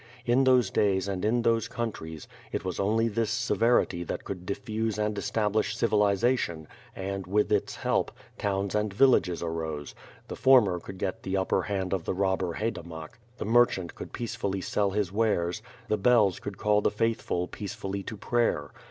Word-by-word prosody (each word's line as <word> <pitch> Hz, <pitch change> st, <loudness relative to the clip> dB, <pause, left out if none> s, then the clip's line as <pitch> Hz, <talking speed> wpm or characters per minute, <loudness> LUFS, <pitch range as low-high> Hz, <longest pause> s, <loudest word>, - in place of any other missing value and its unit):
In 125 Hz, +3 st, +3 dB
those 125 Hz, -5 st, +4 dB
days 95 Hz, -2 st, +2 dB
and 95 Hz, -2 st, -3 dB
in 115 Hz, +3 st, +2 dB
those 115 Hz, -1 st, +2 dB
countries, 110 Hz, -10 st, -5 dB, 0.2 s
it -, -, -3 dB
was 95 Hz, -, -3 dB
only 110 Hz, +4 st, +2 dB
this 115 Hz, 0 st, -1 dB
severity 115 Hz, -5 st, +2 dB
that -, -, -5 dB
could 90 Hz, -2 st, -7 dB
diffuse 110 Hz, +2 st, -2 dB
and 105 Hz, 0 st, 0 dB
establish 110 Hz, +1 st, 0 dB
civilization 105 Hz, -6 st, +1 dB, 0.3 s
and, 95 Hz, -1 st, -4 dB
with 105 Hz, +2 st, +1 dB
its -, -, +1 dB
help, -, -, 0 dB, 0.3 s
towns 100 Hz, -1 st, -1 dB
and 105 Hz, -1 st, 0 dB
villages 100 Hz, -7 st, +3 dB
arose; 80 Hz, -3 st, -4 dB, 0.3 s
the -, -, -6 dB
former 115 Hz, -10 st, +5 dB
could 95 Hz, +2 st, -9 dB
get 95 Hz, 0 st, -3 dB
the 95 Hz, +1 st, -2 dB
upper 95 Hz, -, +1 dB
hand 95 Hz, -3 st, -2 dB
of 95 Hz, -4 st, -2 dB
the -, -, -1 dB
robber 95 Hz, -2 st, 0 dB
haydamak, 85 Hz, -6 st, -5 dB, 0.2 s
the -, -, -4 dB
merchant 110 Hz, -6 st, +3 dB
could -, -, -9 dB
peacefully 110 Hz, -4 st, -3 dB
sell 100 Hz, +2 st, 0 dB
his 100 Hz, -2 st, -1 dB
wares, 105 Hz, -3 st, 0 dB, 0.3 s
the 110 Hz, -, +1 dB
bells 105 Hz, -3 st, +4 dB
could 100 Hz, -2 st, -7 dB
call 105 Hz, 0 st, +2 dB
the -, -, +3 dB
faithful 105 Hz, -5 st, -1 dB
peacefully 100 Hz, 0 st, -5 dB
to 105 Hz, +3 st, -7 dB
prayer. 120 Hz, +3 st, 0 dB
100 Hz, 170 wpm, -28 LUFS, 95-115 Hz, 0.3 s, former